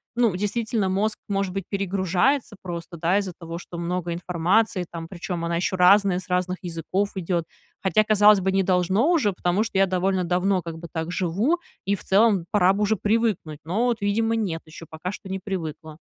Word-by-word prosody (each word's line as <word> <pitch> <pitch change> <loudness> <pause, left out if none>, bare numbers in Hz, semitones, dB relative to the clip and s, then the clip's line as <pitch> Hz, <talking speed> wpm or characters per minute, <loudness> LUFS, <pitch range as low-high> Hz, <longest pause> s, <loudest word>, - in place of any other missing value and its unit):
ну, 235 -6 +2
действительно, 210 +1 -1
мозг, 210 +3 0
может 195 -2 -1
быть, 195 - -3
перегружается 195 +6 0
просто, 170 -1 -6
да, 170 +4 +2
из-за 195 -3 -2
того, 165 0 -7
что 170 0 -8
много 175 0 -2
информации 180 +3 +1
там, 165 -1 -6
причем 175 -1 -5
она 170 0 -1
еще 185 +2 0
разная, 185 0 +5
с 185 - -11
разных 180 0 0
языков 180 +3 -2
идет. 175 -2 -1 0.4
Хотя, 215 +3 +3
казалось 210 -1 +6
бы, 190 +1 0
не 195 0 +2
должно 190 - +2
уже, 270 - +2
потому 180 +3 0
что 220 -4 -2
я 195 - +5
довольно 185 0 0
давно 180 +2 +1
как 165 -1 -7
бы 170 +1 -8
так 160 0 -3
живу, 190 - +1 0.3
и 200 - +1
в - - -11
целом 200 -3 +3
пора 190 -2 +4
бы 205 +2 0
уже 220 +1 +2
привыкнуть. 210 -7 0
Но 205 +9 0
вот, 235 -3 0
видимо, 225 +3 +1
нет 185 -8 -2
еще, 160 +1 -11
пока 160 +3 -5
что 195 - -9
не 190 0 -3
привыкла. 160 -5 -6
190 Hz, 195 wpm, -24 LUFS, 175-205 Hz, 0.4 s, казалось